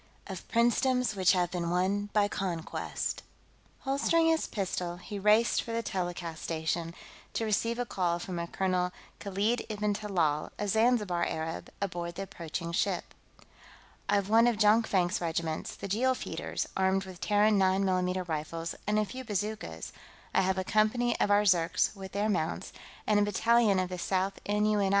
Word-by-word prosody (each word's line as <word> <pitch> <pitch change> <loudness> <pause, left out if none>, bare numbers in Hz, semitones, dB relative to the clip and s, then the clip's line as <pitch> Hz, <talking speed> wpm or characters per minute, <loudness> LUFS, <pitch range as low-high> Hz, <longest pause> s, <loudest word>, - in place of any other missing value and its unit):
Of 190 -4 -8
Princedoms 245 +1 +2
Which 185 -1 +4
Have 175 -2 +1
Been 175 -2 -2
Won 195 +4 0
by 205 -1 +3
Conquest 180 -5 -3 0.6
Holstering 290 +5 +2
his 320 0 +1
pistol, 180 -3 -3
he 200 +3 -7
raced 210 +3 +4
for 230 - -6
the 230 0 -1
telecast 175 -4 -4
station, 165 +1 -2 0.4
to 225 - -1
receive 230 +2 0
a 245 - -1
call 180 -5 0
from 175 0 -5
a 170 - -3
Colonel 180 -1 0 0.3
Khalid 205 +4 0
ib'n 210 -1 0
Talal, 175 -8 0
a 205 - -2
Zanzibar 210 -5 +2
Arab, 160 0 -4
aboard 175 -3 -3
the 195 - -4
approaching 170 -2 -5
ship. 180 +1 -1 1.0
"I've 200 -1 +2
one 225 +3 +5
of 235 -3 +2
Jonkvank's 210 -5 +3
regiments, 160 -1 -2
the - - -6
Jeel 250 +7 +2
Feeders, - - -4
armed 190 0 +2
with 185 -2 -11
Terran 210 0 +3
9 190 +1 +3
mm 185 -1 0
rifles 165 +1 -3
and 210 0 +2
a 215 - +2
few 255 +6 -7
bazookas; 205 - -4 0.4
I - - +4
have 190 0 +1
a 190 - 0
company 215 +4 +2
of - - +2
our 205 0 +5
Zirks, 175 0 +2
with 190 -1 -9
their 205 +2 0
mounts, 175 -6 -2 0.3
and 210 -1 +3
a - - +4
battalion 215 0 +3
of 185 -1 0
the 180 -1 -5
Sixth 190 +2 -1
N.U.N.I. 210 -1 +2
195 Hz, 165 wpm, -30 LUFS, 175-215 Hz, 1.0 s, one